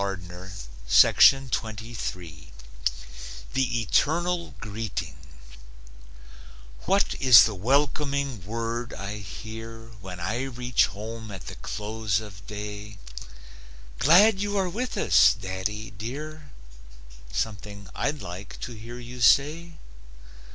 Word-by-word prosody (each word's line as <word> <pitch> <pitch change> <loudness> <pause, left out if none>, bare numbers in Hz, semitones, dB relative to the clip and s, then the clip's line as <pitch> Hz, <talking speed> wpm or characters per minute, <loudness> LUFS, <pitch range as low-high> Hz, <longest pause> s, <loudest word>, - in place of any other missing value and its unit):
THE 125 -3 +1
ETERNAL 170 - +1
GREETING 100 - -5 1.7
What 195 +2 +2
is 130 -4 +9
the 110 - 0
welcoming 140 - 0
word 115 +3 -3
I 100 +2 -5
hear 115 +3 -9
When 90 -2 -8
I 115 +8 -2
reach 125 -2 +1
home 110 +3 -7
at 95 -3 -8
the - - -7
close 105 -1 -2
of 95 -4 -11
day? 105 0 -7 1.0
"Glad 190 +7 +6
you 205 0 -1
are 190 -2 +1
with 240 +8 -3
us, - - +5
daddy, 95 +3 -4
dear?" 145 +8 -7 0.8
Something 100 -1 -4
I'd 145 0 -2
like 90 +2 -8
to - - -5
hear 115 +2 -9
you 125 0 -9
say? 155 +7 +4
115 Hz, 95 wpm, -26 LUFS, 105-140 Hz, 1.7 s, is